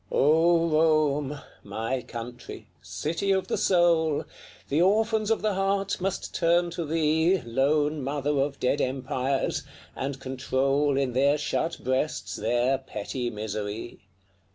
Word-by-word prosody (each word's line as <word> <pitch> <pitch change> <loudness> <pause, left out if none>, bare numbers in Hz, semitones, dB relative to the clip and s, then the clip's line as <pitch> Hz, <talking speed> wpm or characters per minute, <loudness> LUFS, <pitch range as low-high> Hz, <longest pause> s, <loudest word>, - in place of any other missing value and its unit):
O 165 +3 +4
Rome! 155 -3 +2 0.2
my 120 +4 -3
country! 120 +1 -8 0.2
city 165 +6 -3
of 190 -1 +1
the - - +1
soul! 170 -4 +2 0.4
The 150 +4 +1
orphans 215 +3 +2
of 225 - +1
the 215 -1 +1
heart 195 0 0
must 195 +1 -3
turn 170 0 +2
to 170 -1 -4
thee, 160 +3 +2
Lone 145 +4 +1
mother 140 +1 -1
of 140 0 -1
dead 140 +3 +1
empires! 130 +1 -1 0.3
and 135 0 -4
control 135 +2 0
In 135 -3 0
their 140 +3 +3
shut 155 +3 -2
breasts 130 +4 -1
their 120 +4 +1
petty 120 0 -4
misery. 105 +1 -5
145 Hz, 130 wpm, -26 LUFS, 130-170 Hz, 0.4 s, O